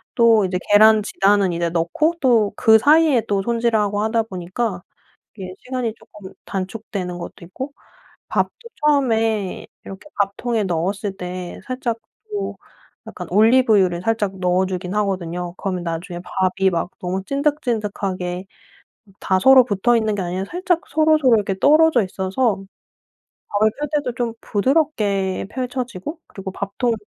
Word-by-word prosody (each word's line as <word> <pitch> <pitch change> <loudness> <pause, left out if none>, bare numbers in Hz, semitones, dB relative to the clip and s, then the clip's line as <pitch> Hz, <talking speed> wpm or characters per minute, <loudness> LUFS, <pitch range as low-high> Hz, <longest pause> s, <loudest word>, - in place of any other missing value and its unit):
또 230 -3 +5
이제 180 0 -1
계란 215 +1 +7
지단은 195 -2 +2
이제 170 0 -1
넣고 175 - 0
또 230 -6 +3
그 220 0 +6
사이에 295 +1 +4
또 200 -1 +1
손질을 230 +1 +1
하고 205 0 0
하다 220 +1 +1
보니까 185 0 -4 0.5
이게 185 -3 -7
시간이 250 -3 -3
쪼끔 200 -4 -14
단축되는 190 -2 -5
것도 170 0 -9
있고 260 +11 -7 0.6
밥도 - - 0 0.3
처음에 225 -8 +1 0.2
이렇게 195 +9 -10
밥통에 210 +3 0
넣었을 195 +3 -2
때 180 -1 -6
살짝 255 -2 -3 0.3
또 410 -1 -4 0.5
약간 - - -8
올리브유를 210 -4 +4
살짝 205 -3 -1
넣어주기는 185 +1 -1
하거든요. 180 -3 -3
그러면 185 -3 -3
나중에 175 +1 -5
밥이 190 +1 +1
막 175 0 -2
너무 185 +1 -3
찐득찐득하게 210 -10 -2 0.8
다 190 - +1
서로 265 +4 +7
붙어 235 +2 +2
있는 220 -2 0
게 200 - -2
아니라 180 +2 -3
살짝 355 -1 0
서로서로 310 -4 +4
이렇게 200 -3 0
떨어져 305 +1 +5
있어서 195 +3 -1 0.9
밥을 210 +1 +2
쓸 295 - -2
때도 290 -5 0
좀 240 -2 -2
부드럽게 205 - 0
펼쳐지고 250 - -4
그리고 195 -1 -7
밥통 200 +5 -2
205 Hz, 315 characters per minute, -21 LUFS, 185-245 Hz, 0.9 s, 계란